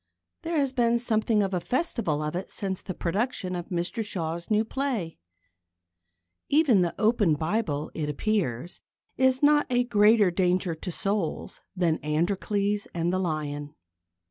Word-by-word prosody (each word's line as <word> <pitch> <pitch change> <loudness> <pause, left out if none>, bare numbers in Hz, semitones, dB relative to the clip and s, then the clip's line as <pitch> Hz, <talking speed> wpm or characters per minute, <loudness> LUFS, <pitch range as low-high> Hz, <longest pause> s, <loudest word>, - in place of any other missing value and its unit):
There 335 -1 -2
has 275 -3 +1
been 235 -2 +3
something 220 -2 +1
of 195 -1 -2
a 180 - +1
festival 230 - -1
of 150 +2 -3
it 185 - -4
since 190 -2 -4
the 185 - -6
production 185 0 -2
of 175 -1 -5
Mr 175 +6 -2
Shaw's 170 -4 -4
new 215 0 +2
play. 235 - -3 1.3
Even 280 - +4
the 175 -1 0
open 215 -7 +3
Bible, 155 -2 -2
it 150 -2 -3
appears, 170 - -2 0.3
is 260 +1 +2
not 295 0 +5
a 245 -1 +2
greater 210 -4 +4
danger 180 0 +1
to 160 +3 -6
souls 195 -1 -3
than 170 -4 +1
Androcles 200 +6 0
and 170 +1 0
the 185 - +1
Lion. 150 -4 -3
195 Hz, 145 wpm, -27 LUFS, 170-230 Hz, 1.3 s, not